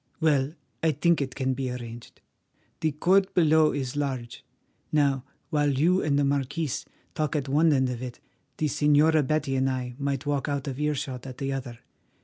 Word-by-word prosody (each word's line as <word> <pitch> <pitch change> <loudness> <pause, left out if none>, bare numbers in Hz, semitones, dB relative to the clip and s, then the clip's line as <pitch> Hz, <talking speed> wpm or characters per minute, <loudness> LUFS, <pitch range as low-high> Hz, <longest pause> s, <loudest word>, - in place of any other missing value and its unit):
Well, 150 -2 +2 0.3
I 160 -1 +2
think 170 +2 +2
it 130 -2 -3
can 130 -1 0
be 130 0 -3
arranged. 120 -1 -8 0.6
The 155 -2 0
court 190 +6 +2
below 160 -2 +5
is 130 -2 -3
large. 130 -5 -3 0.5
Now, 140 -3 +2 0.3
while 145 -1 +2
you 180 +6 +3
and 145 -2 +1
the 145 - +3
marquis 140 +2 -1 0.4
talk 155 -1 -1
at 145 -2 -1
one 155 +4 +4
end 130 -2 +3
of 125 -1 -4
it, 125 -1 -6 0.4
the 155 - 0
Señora 150 +2 +4
Betty 150 -2 0
and 130 0 +2
I 125 -1 -3
might 140 0 -2
walk 145 0 -1
out 140 -1 -2
of 135 0 -4
earshot 135 -4 -2
at 130 -1 -8
the 135 0 -2
other. 125 -3 -6
140 Hz, 180 wpm, -27 LUFS, 130-155 Hz, 0.6 s, below